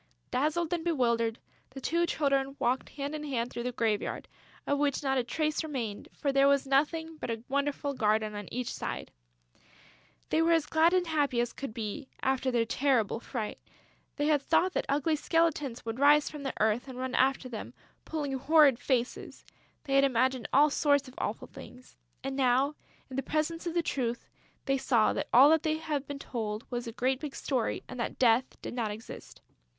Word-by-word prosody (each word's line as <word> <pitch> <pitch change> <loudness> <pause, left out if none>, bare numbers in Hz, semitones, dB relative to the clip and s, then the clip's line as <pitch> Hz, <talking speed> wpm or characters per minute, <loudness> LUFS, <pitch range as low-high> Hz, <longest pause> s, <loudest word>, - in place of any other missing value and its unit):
Dazzled 310 +5 0
and 340 -2 -1
bewildered, 235 -8 +1 0.3
the 270 - -9
two 340 +5 +1
children 275 -3 0
walked 255 +2 0
hand 285 +1 -5
in 305 -1 -4
hand 250 -5 -2
through - - -4
the 250 +1 -2
graveyard, 225 -3 -1 0.4
of 285 0 0
which 290 0 0
not 270 -1 +1
a - - 0
trace 305 +5 -1
remained, 245 -9 -4
for 280 - -1
there 275 0 +4
was 280 0 +3
nothing 315 +4 0
but - - -5
a 225 -1 -3
wonderful 280 +1 -1
garden 215 -3 +1
on 205 -1 -6
every 250 +1 -2
side. - - -5 1.2
They 315 - +3
were 335 +1 +4
as 325 -2 +2
glad 325 +3 +3
and 365 -1 +2
happy 295 -6 +1
as 240 0 0
could 275 -3 -6
be, 225 +5 -5 0.2
after 265 0 +1
their 235 -2 +1
terrible 235 -3 +1
fright. 230 -3 -5 0.6
They 290 - -1
had 300 -2 +3
thought 370 +6 +2
that - - -1
ugly 295 +3 +2
skeletons 300 -6 0
would 225 +2 -4
rise 290 +1 +5
from 300 -2 -8
the 270 -1 -3
earth 220 +4 +1
and 260 -1 -8
run 255 0 -3
after 265 0 +2
them, 230 -4 -7 0.3
pulling 295 -4 -3
horrid 285 -2 +5
faces; 250 -4 -2 0.4
they 275 - -3
had 275 0 +5
imagined 260 -1 +1
all 290 +2 +5
sorts 285 -1 +2
of 255 - -12
awful - - -3
things. 250 0 -13 0.3
And 270 0 -3
now, 265 +2 +2 0.4
in 260 - -5
the - - +1
presence 315 +5 -2
of 340 - -3
the 340 - +2
truth, 240 -6 -2 0.4
they 275 -1 +1
saw 235 -5 +3
that - - -3
all 270 +5 +8
that 320 -1 +4
they 315 0 0
had 300 -3 -3
been 285 - -5
told 220 -5 -4
was 240 -1 -3
a - - -4
great 255 +3 0
big 295 -2 -6
story 255 -5 -1
and 255 - -8
that 235 - -3
Death 245 +1 +2
does - - -5
not 235 -3 -1
exist. 215 +2 -9
270 Hz, 195 wpm, -30 LUFS, 240-300 Hz, 1.2 s, all